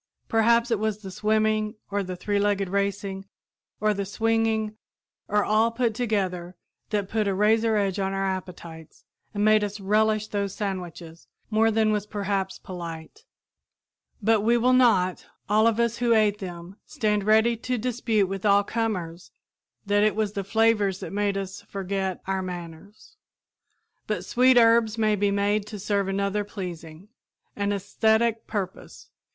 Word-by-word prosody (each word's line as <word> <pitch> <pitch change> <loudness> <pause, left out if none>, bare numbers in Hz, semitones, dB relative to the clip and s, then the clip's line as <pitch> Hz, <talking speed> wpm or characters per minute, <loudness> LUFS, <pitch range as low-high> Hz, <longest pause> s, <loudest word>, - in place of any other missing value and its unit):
Perhaps 235 +1 +3
it 225 - +2
was 215 0 -2
the 190 - -7
swimming, 215 +1 0 0.2
or 200 0 0
the 185 -1 -5
three 205 +3 -1
legged 200 -2 0
racing, 200 0 -2 0.5
or 215 0 +2
the 200 0 -2
swinging, 220 +1 0 0.5
or 210 0 +2
all 220 +2 +3
put 230 -1 0
together, 190 -6 -2 0.3
that 205 -3 -1
put 215 0 -1
a 195 - 0
razor 220 +2 +3
edge 200 -2 0
on 195 0 -1
our 195 0 -1
appetites 175 -4 -7 0.3
and 205 -1 -1
made 215 0 +5
us 205 0 -4
relish 215 +2 +2
those 200 -2 -2
sandwiches 175 -4 -6 0.2
more 220 +1 +3
than 220 -1 +2
was 210 -1 -1
perhaps 200 -2 -2
polite; 165 -3 -9 1.0
but 220 0 +3
will 235 +3 +3
we - - +4
not, 195 -8 +3 0.2
all 215 +2 +4
of 230 0 +1
us 235 0 +1
who 235 -1 +2
ate 210 -1 +2
them, 180 0 -8
stand 210 -7 -1
ready 220 +3 +4
to 250 +2 -3
dispute 230 -3 0
with 195 0 -5
all 200 -1 +4
comers 185 -7 -3 0.6
that 205 0 +2
it 215 0 +2
was 215 -2 -1
the 200 - -3
flavors 210 -2 +2
that - - -7
made 205 -1 0
us 195 -1 -5
forget 190 -1 -4
"our 190 0 -1
manners"? 185 - -9 0.9
But - - -2
sweet 255 +1 +4
herbs 230 -1 +4
may 215 -1 +2
be 205 0 +1
made 200 +1 0
to 210 - -7
serve 200 0 -1
another 200 +1 -1
pleasing, 175 -3 -8 0.5
an 200 0 -1
æsthetic 220 +3 +1
purpose. 190 -3 -6
205 Hz, 155 wpm, -25 LUFS, 195-220 Hz, 1.0 s, made